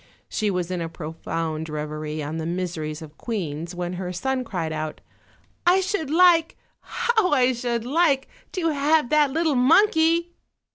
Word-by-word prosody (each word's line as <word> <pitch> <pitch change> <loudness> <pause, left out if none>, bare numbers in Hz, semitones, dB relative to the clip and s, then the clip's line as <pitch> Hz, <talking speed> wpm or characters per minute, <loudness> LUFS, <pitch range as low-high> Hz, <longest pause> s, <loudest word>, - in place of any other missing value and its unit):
She 215 -2 -1
was 180 -2 -2
in 180 -2 -2
a 165 - -3
profound 160 0 -4
reverie 150 0 -4
on 150 +3 -4
the 160 0 -3
miseries 165 -3 -3
of 150 -1 -14
queens, 170 -6 -4
when 175 0 -3
her 180 0 -4
son 255 +8 -1
cried 170 -8 -3
out: 155 0 -4 0.6
"I 360 +2 +5
should 380 -6 -2
like, 335 0 +4 0.2
how 445 -6 0
I 260 -2 +4
should 235 -1 -2
like, 280 -1 +2 0.3
to 340 -3 0
have 295 -2 +2
that 300 -2 +4
little 320 +2 +1
mon 310 +12 +5
key!" 335 0 +1
230 Hz, 160 wpm, -24 LUFS, -, 0.6 s, I